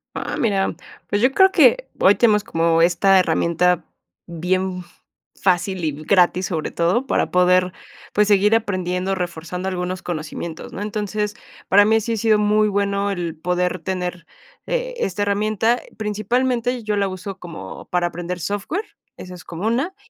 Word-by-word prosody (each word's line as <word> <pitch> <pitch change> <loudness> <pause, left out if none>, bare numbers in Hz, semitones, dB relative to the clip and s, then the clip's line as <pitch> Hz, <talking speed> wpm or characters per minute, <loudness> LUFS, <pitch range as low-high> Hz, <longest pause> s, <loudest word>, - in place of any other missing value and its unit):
Ah, - - -4
mira, 195 -6 0 0.3
pues, 205 +2 0
yo 255 - +5
creo 380 +3 +5
que - - +4
hoy 195 +2 +5
tenemos 215 -3 +3
como 165 -4 +1
esta 185 +2 +4
herramienta 170 0 +1 0.4
bien 180 +2 -2 0.6
fácil 185 -1 +1
y 155 - 0
gratis, 180 +4 +2
sobre 160 -4 -3
todo, 180 +10 +1
para - - 0
poder, 180 0 +3 0.4
pues, 210 0 +3
seguir 210 +2 +4
aprendiendo, 185 -3 -1
reforzando 180 0 -4
algunos 180 0 -3
conocimientos, 160 0 -6
¿no? - - -5
Entonces, 210 0 -3 0.3
para 205 +1 +6
mí 220 +1 +3
sí 230 +2 -2
ha - - -2
sido 220 0 +3
muy 210 +1 +3
bueno 200 0 0
el 170 -3 -4
poder 180 +2 -1
tener, 180 0 -4 0.4
eh, - - -2
esta 195 - -2
herramienta. 215 +3 +1 0.2
Principalmente, 240 +3 -1
yo 210 -1 -1
la 200 -1 +1
uso 190 +1 -6
como 175 -2 -9
para 175 -1 0
aprender 175 +1 -5
software, 205 - -3 0.3
esa 180 0 -9
es 175 - -12
como 175 +5 -5
una, 270 +11 -1
190 Hz, 155 wpm, -21 LUFS, 180-210 Hz, 0.6 s, para